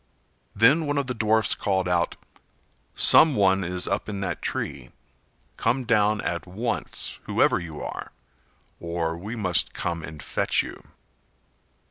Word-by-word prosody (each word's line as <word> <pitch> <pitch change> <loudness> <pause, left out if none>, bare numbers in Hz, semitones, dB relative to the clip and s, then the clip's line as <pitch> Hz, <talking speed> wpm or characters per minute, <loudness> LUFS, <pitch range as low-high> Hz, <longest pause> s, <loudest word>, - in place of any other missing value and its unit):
Then 140 +9 +5
one 145 0 -1
of 140 - 0
the 125 - -3
dwarfs 110 -1 +2
called 95 -2 -1
out: 90 -1 +1 0.8
"Some 155 -3 +6
one 95 -2 +3
is 90 0 -3
up 100 +2 -2
in 100 -2 -4
that 95 - -3
tree. 65 -3 -4 0.6
Come 125 +3 +1
down 105 -3 +2
at 85 +1 -3
once, 115 +6 -3
whoever - - +2
you 80 -4 -7
are, - - -6 0.7
or 85 -1 -2
we 100 +8 -6
must 90 -7 0
come 85 -2 -2
and 80 -1 -9
fetch - - +1
you." - - -9
100 Hz, 140 wpm, -25 LUFS, 85-115 Hz, 0.8 s, Some